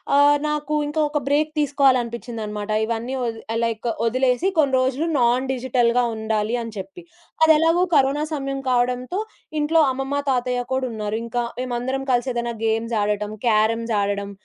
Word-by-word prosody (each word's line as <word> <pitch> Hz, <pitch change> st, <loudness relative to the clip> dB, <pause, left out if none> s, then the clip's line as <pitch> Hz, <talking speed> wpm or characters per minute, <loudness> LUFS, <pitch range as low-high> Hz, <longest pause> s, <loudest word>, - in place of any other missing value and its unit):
ఆహ్, 290 Hz, +1 st, +6 dB
నాకు 300 Hz, 0 st, -1 dB
ఇంకా 310 Hz, +1 st, -1 dB
ఒక 295 Hz, 0 st, 0 dB
బ్రేక్ 300 Hz, +2 st, +2 dB
తీసుకోవాలని 280 Hz, -3 st, +3 dB
అనిపించిందన్నమాట. 225 Hz, -3 st, -6 dB, 0.2 s
ఇవన్నీ 230 Hz, +3 st, -3 dB
ఒది 225 Hz, -1 st, -4 dB
ఆహ్, 230 Hz, -, -1 dB
లైక్ 230 Hz, +1 st, -3 dB, 0.2 s
ఒదిలేసి, 255 Hz, -, +2 dB
కొన్ని 280 Hz, -4 st, +3 dB
రోజులు 265 Hz, +5 st, 0 dB
నాన్ 245 Hz, +2 st, +2 dB
డిజిటల్‌గా 245 Hz, -1 st, +1 dB
ఉండాలి 220 Hz, +1 st, -1 dB
అని 230 Hz, -1 st, -7 dB
చెప్పి. 295 Hz, -, -8 dB, 0.4 s
అదెలాగో 325 Hz, +3 st, +4 dB
కరోనా 280 Hz, +1 st, +3 dB
సమయం 275 Hz, -2 st, -3 dB
కావడంతో, 250 Hz, +7 st, 0 dB, 0.4 s
ఇంట్లో 320 Hz, +2 st, +3 dB
అమ్మమ్మ, 270 Hz, +2 st, -2 dB
తాతయ్య 250 Hz, -1 st, 0 dB
కూడా 260 Hz, 0 st, 0 dB
ఉన్నారు. 215 Hz, -1 st, -3 dB
ఇంకా 240 Hz, +1 st, -2 dB, 0.2 s
మేమందరం 255 Hz, +2 st, -2 dB
కలిసి 245 Hz, +1 st, +1 dB
ఏదైనా 235 Hz, 0 st, -2 dB
గేమ్స్ 225 Hz, +1 st, 0 dB
ఆడటం, 210 Hz, 0 st, -1 dB, 0.2 s
క్యారమ్స్ 225 Hz, +1 st, +2 dB
ఆడడం 200 Hz, 0 st, -2 dB
250 Hz, 150 wpm, -22 LUFS, 230-280 Hz, 0.4 s, ఆహ్